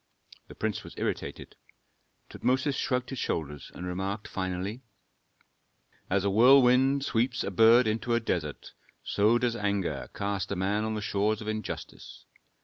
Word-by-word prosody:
The - - -12
prince 110 -3 -2
was - - -11
irritated. - - -4 0.7
Tutmosis 130 +3 0
shrugged 125 0 -1
his 135 - -4
shoulders, 75 -2 -3
and 90 - -6
remarked 95 +4 -3
finally, 95 +5 -4 1.3
"As 95 0 +1
a - - +3
whirlwind 130 +4 +5
sweeps 120 0 0
a - - -3
bird 115 +5 +6
into 115 +2 0
a - - +3
desert, 85 -10 -3 0.3
so 105 +3 +3
does 120 -1 0
anger 100 -4 -2
cast 100 -1 -2
a - - 0
man 100 +3 0
on 110 0 -2
the 105 - -3
shores 105 +1 0
of 110 - -8
injustice. 110 0 -6
110 Hz, 145 wpm, -28 LUFS, 100-120 Hz, 1.3 s, bird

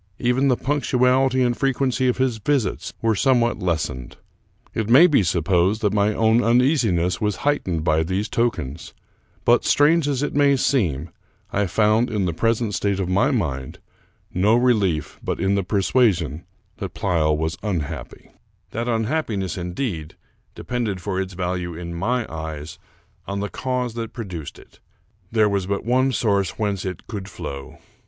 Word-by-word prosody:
Even 125 +3 +1
the 125 -3 +3
punctuality 130 -2 +2
and 120 -1 +1
frequency 130 -1 0
of 125 - +1
his 130 -4 0
visits 130 -2 -1
w^ere 115 -1 +3
somewhat 120 0 +2
less 85 -4 0
ened. 65 -1 -8 0.6
It 110 -1 -2
may 135 +9 +8
be 150 -10 +4
supposed 90 +4 +1
that 105 -2 +1
my 105 0 +2
own 110 +2 +3
uneasiness 115 - +2
was 105 -2 0
heightened 90 - 0
by 80 -1 +2
these 95 +6 -1
tokens; 85 - -2 0.5
but, - - +4
strange 150 +1 +4
as 140 -1 0
it - - -2
may 140 -1 +4
seem, 95 - 0 0.4
I 100 0 +1
found, 110 +5 +2
in 105 -4 -1
the 85 - -1
present 115 +3 0
state 100 +1 0
of 95 -2 -2
my 100 +9 +3
mind, 70 - -2 0.6
no 100 +5 +3
relief 100 - +1
but - - -2
in 95 0 +1
the 100 - +2
persuasion 90 - +1 0.3
that - - -6
Pleyel 80 -6 +1
was 80 +1 -2
unhappy. 90 -9 -5 0.4
That 115 +1 -3
unhappiness, 110 - -1
indeed, 90 - -4 0.4
depended 115 -6 -3
for 95 0 -2
its 95 0 -5
value 90 -2 -3
in 85 0 -6
my 115 +8 -1
eyes 80 -1 -7 0.5
on 100 0 -3
the 100 +1 -3
cause 125 -2 -2
that 115 -1 -5
produced 90 - -7
it. - - -18 0.5
There 110 -2 +4
was 100 -2 -1
but 100 +1 -2
one 130 +3 +2
source 100 -7 0
whence 100 -4 -2
it 90 -2 -5
could 100 -4 -6
flow. 70 -1 -7
105 Hz, 160 wpm, -22 LUFS, 90-125 Hz, 0.6 s, may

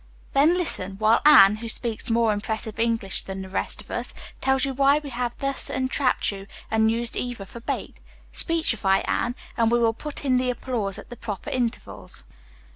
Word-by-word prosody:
"Then 305 +6 +4
listen, 195 - +2
while 220 +3 +3
Anne, 210 -8 +8
who 230 +1 -6
speaks 230 +1 -2
more 230 -1 +2
impressive 220 +1 -4
English 225 -4 +1
than 190 0 -6
the 190 - -10
rest 190 - -3
of - - -14
us, - - -4 0.3
tells 265 0 +2
you 270 - -3
why 275 +2 +4
we 295 -2 -6
have 240 0 -3
thus 275 -1 -1
entrapped 260 -2 0
you 195 0 -9 0.2
and 220 0 +3
used 230 +1 +1
Eva 245 -5 -4
for 235 - -11
a - - -18
bait. - - -4 0.3
Speechify, 225 - +3
Anne, 245 +1 -1 0.2
and 230 -2 +3
we 240 - +3
will 230 -1 +2
put 290 +4 -8
in 255 -2 +3
the 250 0 0
applause 235 -6 -3
at - - -12
the - - -6
proper 210 -5 -6
intervals." 230 - -2
235 Hz, 195 wpm, -24 LUFS, 215-260 Hz, 0.3 s, Anne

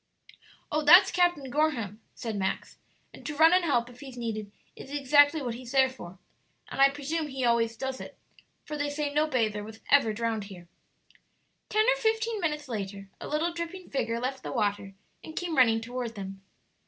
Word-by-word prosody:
"Oh, 305 - +1
that's 350 +6 +8
Captain 350 -7 +1
Gorham," 240 -8 0
said 225 -3 -4
Max. 190 -1 -3 0.3
"and - - -13
to 300 - -5
run 320 +2 +7
and 365 0 +4
help 240 -7 +1
if 245 0 -14
he's 265 -2 -10
needed 215 -3 -4 0.2
is - - -11
exactly 290 +1 +4
what 240 -2 -2
he's 245 +1 -9
there 265 -1 +4
for. 185 -8 -11 0.5
And - - -2
I 275 - +8
presume 295 +3 -3
he 265 -3 -3
always 230 -1 +2
does 265 -1 -4
it; - - -10 0.5
for 300 - -5
they 290 0 -1
say 290 0 -2
no 300 +1 +2
bather 220 -7 0
was 220 +1 -10
ever 275 -6 +5
drowned 220 -1 -2
here." 180 -4 -12 1.0
Ten 430 +1 +3
or - - +3
fifteen 445 -1 0
minutes 300 -3 -2
later 195 -4 -5
a - - -7
little 320 +3 0
dripping 340 +2 -6
figure 230 -4 -1
left 260 +2 -3
the - - -6
water, 205 -4 -1 0.3
and 315 - -10
came 350 -3 -2
running 225 -4 +4
toward 240 0 -5
them. 195 -1 -7
265 Hz, 190 wpm, -28 LUFS, 225-305 Hz, 1.0 s, that's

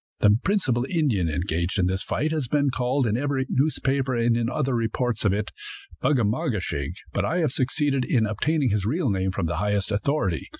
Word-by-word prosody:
The 105 0 +6
principal 145 - +1
Indian 130 - +1
engaged 85 +3 -1
in 95 - +2
this 95 +1 0
fight 155 +1 -1
has 155 -5 -1
been 140 +1 +1
called, 130 +2 0
in 110 -1 +1
every 135 +1 0
newspaper 135 -2 0
and 115 0 +1
other 135 -1 -1
reports 115 -1 -1
of 100 - +4
it, 105 +2 -2 0.5
Bug 150 - +2
a 120 - +2
ma 110 +5 0
ge - - 0
shig; 70 -4 -3 0.2
but - - 0
I 170 - 0
have 160 -7 +1
succeeded 135 +1 0
in 115 -4 +2
obtaining 130 +5 0
his 105 -1 0
real 145 - 0
name 95 -1 0
from 95 -1 -2
the 85 - -2
highest 105 0 0
authority. 100 - 0
120 Hz, 205 wpm, -25 LUFS, 100-140 Hz, 0.5 s, The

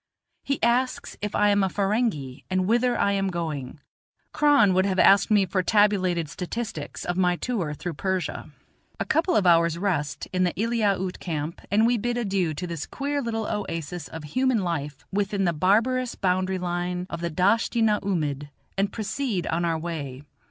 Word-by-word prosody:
he 275 - -1
asks 245 +2 +1
if 210 0 -3
I 210 0 +4
am 205 0 +3
a 190 - +2
Ferenghi 195 - -1
and 185 0 +1
whither 240 +4 +2
I 200 - +2
am 195 -1 0
going; 160 -6 -4 0.5
Kron 285 -10 +5
would 190 +1 +3
have 190 -1 -1
asked 195 +3 +6
me 205 -3 +4
for 185 +1 0
tabulated 185 -5 +2
statistics 180 0 -5
of 175 0 -2
my 180 -1 +3
tour 175 -8 -2
through 175 +4 -5
Persia. 190 +3 -3 0.5
A - - -1
couple 335 +3 +1
of 195 - +3
hours' 170 -1 +4
rest 170 -7 -2
in 185 0 +2
the 180 - +1
Eliaute 205 -5 0
camp, 160 -1 -4
and 215 +3 +4
we 240 0 +2
bid 240 +3 -1
adieu 195 -8 0
to 180 - -4
this 170 -4 -5
queer 285 +1 -2
little 225 -3 -2
oasis 165 -6 -4
of 160 +3 -8
human 250 - +1
life 150 -5 -4
within 200 0 0
the 175 -2 +2
barbarous 230 +9 +2
boundary 185 0 0
line 180 0 -2
of 170 - -6
the 170 - -1
Dasht 205 +9 +2
i - - +3
na 215 -2 +3
oomid, 150 -7 -2 0.3
and 200 0 +1
proceed 220 -2 -2
on 170 +1 -1
our 165 -1 +1
way. 145 -5 -5
190 Hz, 180 wpm, -25 LUFS, 170-215 Hz, 0.5 s, asked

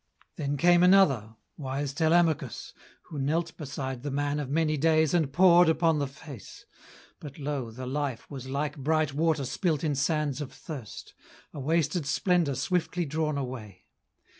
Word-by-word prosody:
Then 145 -1 -2
came 175 +4 +5
another 150 - +4 0.2
wise 135 0 -3
Telemachus 160 -4 +1 0.3
Who 150 - -8
knelt 160 +5 -1
beside 135 -4 -5
the 145 - -4
man 145 +1 -1
of 140 -3 -4
many 155 +1 +1
days 155 +1 +2
And 160 -6 +1
pored 175 +1 +6
upon 160 -1 +2
the 140 - -1
face; 135 - -12 0.5
but 145 -2 -10
lo, 140 -5 -3
the 125 +3 -8
life 135 -2 -3
Was 130 -2 -8
like 145 +2 -2
bright 155 +1 0
water 155 -1 +1
spilt 150 +3 -1
in 155 -2 +1
sands 145 0 0
of 140 - -6
thirst, 135 - -9 0.4
A 150 - -7
wasted 155 +1 0
splendour 170 -1 +1
swiftly 175 +4 -1
drawn 155 0 -1
away. 115 -8 -7
145 Hz, 155 wpm, -28 LUFS, 135-160 Hz, 0.5 s, pored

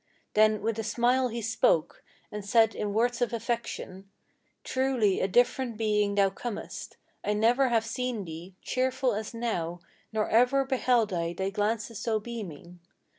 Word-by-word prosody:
Then 215 -1 +4
with 225 0 -1
a - - -1
smile 245 +4 +2
he 235 -1 -5
spoke, 215 -7 +1 0.3
and 210 -1 -5
said 225 +2 +4
in 205 - -3
words 235 +3 +1
of 240 -1 +1
affection: 225 -4 -4 0.5
"Truly 260 -7 +1
a - - +1
different 245 +2 +2
being 210 -2 +1
thou 195 -1 +4
comest! 225 +3 -6 0.3
I 210 - 0
never 240 +5 +3
have 225 -2 +2
seen 235 -2 -3
thee 170 +3 -9
Cheerful 255 -1 0
as 215 +2 -4
now, 175 -8 -2 0.3
nor 215 -1 0
ever 250 +4 +4
beheld 245 -5 +2
I 170 -1 -1
thy 190 +2 -2
glances 215 +1 -1
so 220 -1 0
beaming. 180 -7 -8
220 Hz, 155 wpm, -28 LUFS, 200-240 Hz, 0.5 s, Then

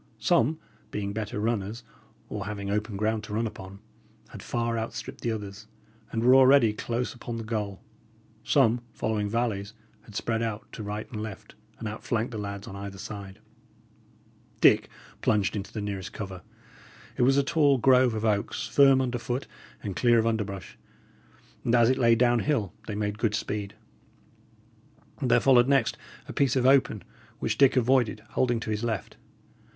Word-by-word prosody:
Some, 145 +8 +2 0.3
being 100 -1 -3
better 105 -1 -4
runners, 110 +1 -2 0.4
or 105 -1 -5
having 100 -1 -4
open 105 0 -2
ground 110 +1 0
to 105 - -5
run 115 +2 0
upon, 95 -3 -8 0.5
had - - -10
far 115 -1 -1
outstripped 115 0 -5
the 115 - -1
others, 105 0 -6 0.4
and 115 - -1
were 125 +2 +6
already 130 -4 +6
close 120 +3 -3
upon 120 -1 -6
the 115 - -5
goal; 105 -3 -4 0.6
some, 120 -4 +3
following 105 -2 -1
valleys, 110 -2 -2 0.3
had 110 -2 -15
spread 115 +1 -1
out 110 -2 -3
to - - -8
right 105 +1 -5
and 110 -3 -5
left, 110 -3 -8 0.2
and 110 - -5
outflanked 110 +2 -2
the 110 - -5
lads 100 0 -6
on 95 - -8
either 100 0 -7
side. 100 -1 -8 1.2
Dick - - +5 0.3
plunged 100 -2 +1
into 100 -1 -5
the 110 - -4
nearest 100 -2 -5
cover. 95 -3 -6 0.7
It - - -2
was 135 +3 +4
a 140 - +4
tall 145 -2 +3
grove 125 -1 +4
of 110 +1 -2
oaks, 105 -2 0
firm 135 -2 +5
under 125 -2 -1
foot 125 +3 -3 0.4
and 100 -3 -4
clear 120 +2 +4
of 115 - +3
underbrush, 105 -5 -3 0.8
and 120 - +2
as 120 0 +5
it 130 - -1
lay 115 -2 +5
down 120 0 +3
hill, 115 - 0
they 105 - -4
made 105 0 -2
good 110 -3 +1
speed. 105 -2 -4 1.5
There 125 -2 +4
followed 125 -2 +5
next 135 -4 +2 0.3
a - - -7
piece 140 -3 +2
of 130 -1 +2
open, 130 -6 +4 0.3
which 110 -2 -2
Dick 135 -1 +6
avoided, 120 -4 +2
holding 120 -2 +1
to 110 - -4
his 105 +1 -2
left. 110 -5 -3
110 Hz, 170 wpm, -27 LUFS, 105-120 Hz, 1.5 s, were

